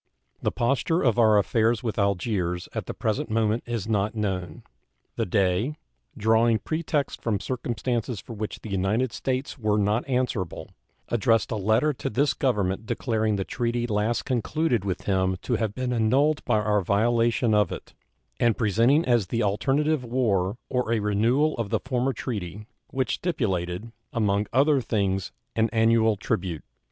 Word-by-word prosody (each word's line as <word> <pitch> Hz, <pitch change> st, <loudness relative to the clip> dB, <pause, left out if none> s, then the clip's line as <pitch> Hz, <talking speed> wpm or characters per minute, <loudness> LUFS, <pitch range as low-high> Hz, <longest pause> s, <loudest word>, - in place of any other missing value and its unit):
The -, -, 0 dB
posture 140 Hz, +8 st, +1 dB
of 120 Hz, -3 st, +2 dB
our 110 Hz, -2 st, +6 dB
affairs 115 Hz, +3 st, +2 dB
with 110 Hz, -2 st, -2 dB
Algiers 95 Hz, -3 st, 0 dB
at -, -, -4 dB
the -, -, -4 dB
present 110 Hz, -2 st, -1 dB
moment 110 Hz, +1 st, +1 dB
is 115 Hz, -4 st, -3 dB
not 105 Hz, 0 st, 0 dB
known. 95 Hz, -5 st, -3 dB, 0.5 s
The -, -, -1 dB
Dey, 95 Hz, -, +1 dB, 0.4 s
drawing 115 Hz, +1 st, +3 dB
pretexts 155 Hz, +2 st, -2 dB
from 110 Hz, -4 st, 0 dB
circumstances 120 Hz, -1 st, -2 dB
for 115 Hz, -, -9 dB
which 110 Hz, -1 st, -5 dB
the 110 Hz, -, -8 dB
United 105 Hz, +6 st, 0 dB
States 130 Hz, +2 st, -3 dB
were 105 Hz, -2 st, +1 dB
not 105 Hz, +5 st, 0 dB
answerable, 125 Hz, -9 st, -2 dB, 0.4 s
addressed 115 Hz, 0 st, +2 dB
a -, -, 0 dB
letter 110 Hz, +9 st, +2 dB
to -, -, -4 dB
this 140 Hz, +6 st, +1 dB
Government 105 Hz, -5 st, 0 dB
declaring 110 Hz, -3 st, 0 dB
the 95 Hz, -, -1 dB
treaty 120 Hz, +2 st, -1 dB
last 110 Hz, +1 st, 0 dB
concluded 130 Hz, -, 0 dB
with 95 Hz, -2 st, -2 dB
him 95 Hz, -1 st, +1 dB
to 120 Hz, -, 0 dB
have 110 Hz, -2 st, -2 dB
been 130 Hz, -1 st, -2 dB
annulled 135 Hz, +7 st, +2 dB
by -, -, +2 dB
our 105 Hz, -1 st, +1 dB
violation 115 Hz, +4 st, +2 dB
of 105 Hz, -3 st, +3 dB
it, -, -, -8 dB, 0.5 s
and 120 Hz, -2 st, +3 dB
presenting 115 Hz, -, +3 dB
as 120 Hz, -6 st, +2 dB
the 115 Hz, +4 st, -1 dB
alternative 135 Hz, +8 st, +1 dB
war 115 Hz, -5 st, 0 dB
or 125 Hz, -3 st, -1 dB
a 115 Hz, -, +3 dB
renewal 115 Hz, +9 st, +2 dB
of 110 Hz, -3 st, -2 dB
the -, -, +1 dB
former 130 Hz, 0 st, -1 dB
treaty, 105 Hz, -5 st, -5 dB, 0.2 s
which 130 Hz, -1 st, -1 dB
stipulated, 105 Hz, -, -2 dB, 0.2 s
among 105 Hz, -2 st, +1 dB
other 140 Hz, +2 st, +3 dB
things, 95 Hz, -, -1 dB, 0.2 s
an 115 Hz, 0 st, +2 dB
annual 115 Hz, -1 st, +3 dB
tribute. 90 Hz, -5 st, -2 dB
115 Hz, 160 wpm, -25 LUFS, 100-125 Hz, 0.5 s, our